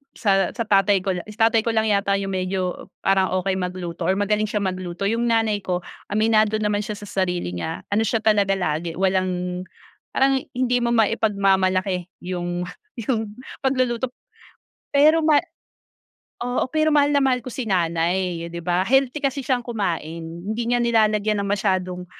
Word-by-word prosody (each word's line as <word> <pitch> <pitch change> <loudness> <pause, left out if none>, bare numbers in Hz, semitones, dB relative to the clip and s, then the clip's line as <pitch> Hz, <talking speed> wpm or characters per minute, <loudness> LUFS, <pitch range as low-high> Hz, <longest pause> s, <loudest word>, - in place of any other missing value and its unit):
sa 195 -3 +2
sa 230 - -1
tatay 195 -2 +3
ko 195 - 0
lang 180 -2 -4
si 210 - -10
tatay 225 0 +4
ko 225 0 -1
lang 220 -1 +2
yata 200 -1 +2
yung 195 0 -2
medyo 185 -1 -2 0.2
parang 190 -1 +2
okey 195 -1 0
magluto 180 -2 -4
or 190 - +3
magaling 210 +1 +1
siya 210 -1 -2
magluto. 185 0 -3
Yung 230 +3 +1
nanay 225 -3 +1
ko 180 -2 -2 0.3
aminado 215 0 +3
naman 210 -1 0
siya 210 0 -5
sa 205 - -9
sarili 180 - -2
niya, 160 - -4
ano 210 +2 +2
siya 220 0 0
talaga 205 -3 +3
lagi 165 -1 -2
walang 185 -1 0 0.5
parang 270 0 +3 0.2
hindi 250 -1 +2
mo 235 - +1
maipagmamalaki 195 -5 +1 0.2
yung, 175 -1 -3 0.3
yung 225 -2 -2 0.2
pagluluto. 255 -2 0 0.8
Pero 305 +3 +5
ma 310 -2 +5 1.1
oo, 250 +1 -1
pero 310 +1 +2
mahal 290 -1 +4
na 285 - +4
mahal 250 -2 +2
ko 255 - -7
si 250 0 -4
nanay 175 -1 0
'di 170 0 -7
ba, 175 +2 0
healthy 270 +3 +2
kasi 275 0 -1
siyang 245 -1 -1
kumain 170 -8 -3
hindi 175 +8 -5
niya 245 - +3
nilalagyan 215 -3 +2
ng 200 - -3
masyadong 185 -3 -1
200 Hz, 165 wpm, -23 LUFS, 185-230 Hz, 1.1 s, Pero